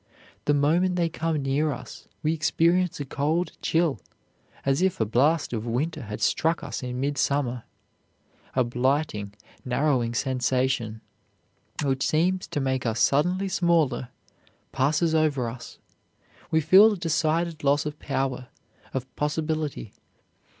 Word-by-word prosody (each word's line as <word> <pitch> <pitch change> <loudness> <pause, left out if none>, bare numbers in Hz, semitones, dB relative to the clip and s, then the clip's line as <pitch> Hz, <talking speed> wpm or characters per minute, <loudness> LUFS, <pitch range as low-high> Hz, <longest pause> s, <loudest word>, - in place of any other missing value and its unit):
The 145 - +3
moment 170 +6 +2
they 170 -2 +1
come 160 -2 -2
near 145 +3 +1
us 125 -2 -9 0.2
we 155 +1 +2
experience 165 +2 +1
a 145 - -3
cold 155 +6 -1
chill, 165 -3 +1 0.7
as 135 +3 +2
if 190 -1 +1
a 110 - +2
blast 140 +8 +2
of 115 0 -3
winter 135 +8 -1
had 105 -2 -7
struck 165 +1 +1
us - - -5
in 125 -1 -4
midsummer. 140 -3 0 0.9
A 130 - +4
blighting, 120 -4 -1 0.3
narrowing 125 -2 0
sensation, 130 -3 0 0.8
which 135 -1 0
seems 180 +4 +1
to 160 -2 -3
make 130 -2 -1
us 115 -1 -1
suddenly 180 +7 +2
smaller, 170 -9 +1 0.6
passes 150 +5 +1
over 150 -6 +2
us. 115 +1 -8 0.7
We 160 -1 +2
feel 200 +8 +7
a - - -4
decided 165 -1 0
loss 145 +1 +2
of 150 0 -5
power, 135 -3 -2 0.5
of 130 -1 -5
possibility. 150 -5 -2
145 Hz, 130 wpm, -26 LUFS, 130-165 Hz, 0.9 s, feel